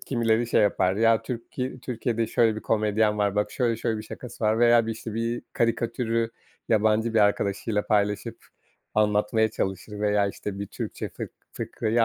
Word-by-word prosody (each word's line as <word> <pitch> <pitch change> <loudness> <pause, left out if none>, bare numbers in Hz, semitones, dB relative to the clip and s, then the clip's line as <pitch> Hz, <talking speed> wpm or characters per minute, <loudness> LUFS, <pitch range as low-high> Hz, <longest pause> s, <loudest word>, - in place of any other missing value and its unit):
kimileri 115 -2 +1
şey 110 - +3
yapar, 95 -2 +2
ya, 115 0 +4
Türki 125 +1 -5
Türkiye'de 115 -2 -1
şöyle 110 -1 +2
bir - - -4
komedyen 105 -1 +1
var, 100 -1 +1
bak 105 0 0
şöyle 120 -3 0
şöyle 115 -1 -1
bir 110 - -6
şakası 115 +1 -7
var 110 +1 +3
veya 120 -1 +5
bir, 115 - -1
işte, 110 -1 -7
bir 115 +1 -2
karikatürü 115 0 0 0.4
yabancı 110 +1 +2
bir - - +4
arkadaşıyla 105 +1 +1
paylaşıp 105 -1 0 0.5
anlatmaya 105 +1 +2
çalışır 95 +1 -4
veya, 105 -1 +2
işte, 100 0 -6
bir 100 - -4
Türkçe - - -5
fık - - -7 0.2
fıkrayı 115 +1 0
110 Hz, 165 wpm, -26 LUFS, 105-115 Hz, 0.5 s, veya